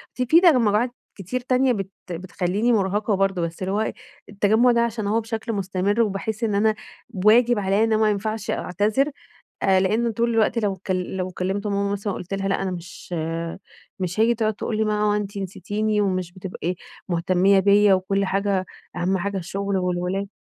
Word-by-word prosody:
ف - - -26
في 320 +8 +5
تجمعات 240 - +4 0.2
كتير 200 +6 -4
تانية 255 0 +2
بت 195 -3 -4 0.2
بتخليني 185 +6 -1
مرهقة 205 +1 +1
برضو، 195 -2 +1
بس 170 +1 -4
اللي 190 +1 -2
هو 215 - +1
إيه، - - -2 0.4
التجمع 215 +5 +3
ده 235 0 +3
علشان 225 -3 -1
هو 225 +2 +1
بشكل 225 0 -4
مستمر، 195 +3 0
وباحس 215 +2 -2
إن 210 -3 +1
أنا 215 +1 +3 0.5
واجب 235 +1 +5
عليَّ 195 +2 +2
إن 225 -1 +2
ما 215 -1 +3
ينفعش 215 +2 -3
أعتذر 215 - 0 0.5
آآ؛ 190 -1 +4
لأنّه 220 +5 +1
طول 235 +2 0
الوقت 225 +1 +2
لو 205 -4 0
كل 185 0 -3
لو 185 0 -2
كلمت 190 +3 -3
ماما 200 0 0
مثلًا 205 0 -2
قلت 180 +2 -5
لها 195 0 -2
لأ 195 - 0
أنا 190 - -1
مش 180 0 -8 0.9
مش 185 +3 -2
هاجي، 235 +1 +4
تقعد 220 -2 0
تقول 215 +1 -3
لي 220 - +1
ما 210 0 0
هو 210 0 +3
أنتِ 205 0 -4
نسيتيني 210 +2 -2
ومش 185 -3 -1
بتبقي 180 -1 -4 0.3
مهتمية 185 +3 +3
بيّا، 200 +1 +5
وكل 195 +1 0
حاجة 195 -1 0 0.3
أهم 185 +2 0
حاجة 200 +2 -3
الشغل 195 +2 -3
والولاد. 180 +2 -1
200 Hz, 180 wpm, -23 LUFS, 190-220 Hz, 0.9 s, في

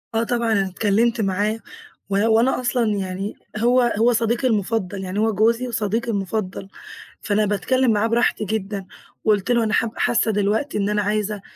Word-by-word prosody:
آه 225 - +2
طبعًا، 235 -1 0
أنا 195 -3 +2
اتكلمت 220 +4 +1
معاه 205 +3 0 0.5
و 195 - -1
وأنا 230 +4 +3
أصلًا 245 -1 +1
يعني 190 +1 -4 0.2
هو 240 +2 +3
هو 240 +2 +4
صديقي 235 +3 +1
المُفضل، 205 -3 -1
يعني 185 +2 -3
هو 220 0 +2
جوزي 230 +4 +2
وصديقي 225 0 -1
المُفضل 195 -1 -3 0.5
فأنا 210 0 +1
باتكلم 245 +5 +1
معاه 210 +2 +1
براحتي 230 -2 +1
جدًا، 200 -1 -3 0.4
وقُلت 210 +1 +2
له: 235 -1 +3
"أنا 215 - -1
حاب 230 -1 +1
حاسة 230 -1 +2
دلوقتي 210 +6 0
إن 200 0 0
أنا 210 0 +1
عايزة 210 0 -1
215 Hz, 165 wpm, -22 LUFS, 200-235 Hz, 0.5 s, هو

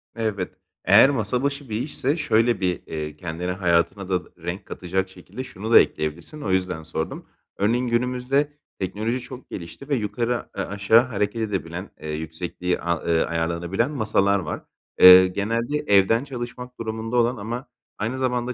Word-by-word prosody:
Evet. 110 -5 -2 0.3
Eğer 135 - +8
masa 125 -1 -1
başı 140 -1 -2
bir 110 +1 -1
işse 145 +1 -1
şöyle 115 -6 +2
bir, 90 -1 0
eee, 75 -1 -5
kendine, 85 +2 -4
hayatına 90 +1 +1
da 90 -2 -1
renk 85 +3 -5
katacak 95 +1 -2
şekilde 95 +7 -9
şunu 110 -3 -6
da - - +10
ekleyebilirsin, 80 - -2
o 100 - -2
yüzden 90 -4 0
sordum. 80 0 -4 0.3
Örneğin, 120 +5 +1
günümüzde 125 +4 0 0.3
teknoloji 110 +6 -2
çok 130 +1 -10
gelişti 95 - -8
ve 145 - +3
yukarı 120 +2 -1
a - - -9
eee, 100 - 0
aşağı 100 +3 +4
hareket 115 -2 -2
edebilen, 95 -3 -3
eee, 80 - -6
yüksekliği 80 +3 -3
a 85 0 0
ııı, 85 -1 +2
ayarlanabilen 85 - -1
masalar 100 -6 +2
var. 75 -5 -4 0.4
Eee, 90 0 +10
genelde 115 +9 -1
evden 100 +4 +4
çalışmak 125 -2 -7
durumunda 110 +1 -3
olan 120 +1 +2
ama 120 +6 -5 0.3
aynı 115 +5 -2
zamanda 125 -1 -1
105 Hz, 160 wpm, -24 LUFS, 90-125 Hz, 0.4 s, da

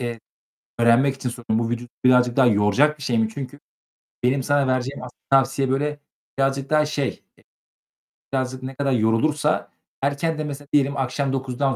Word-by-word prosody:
eee 120 -2 -4 0.6
öğrenmek 120 +4 +4
için 130 -2 -4
soruyorum, 120 -2 -2
bu - - -3
vücudu 120 +1 -4 0.2
birazcık 125 -1 +4
daha 135 - +6
yoracak 115 +8 +3
bir 140 - -10
şey 120 -3 0
mi? 110 0 +2
Çünkü 140 +2 -7 0.6
benim 130 +2 +2
sana 145 +1 +2
vereceğim 130 +1 -1
asıl 125 -1 -10
tavsiye, 135 0 +3
böyle, 145 +2 -1 0.4
birazcık 135 +1 0
daha 150 -1 +3
şey, 140 -3 -3 0.2
e - - -24 0.9
birazcık 130 0 -2
ne 130 +1 -6
kadar 140 0 -1
yorulursa 135 +7 +1 0.3
erkenden 150 +3 -1
mesela 145 0 -7
diyelim, 140 -1 +2
akşam 135 +1 -1
9.00'dan 135 0 -1
135 Hz, 165 wpm, -23 LUFS, 125-140 Hz, 0.9 s, daha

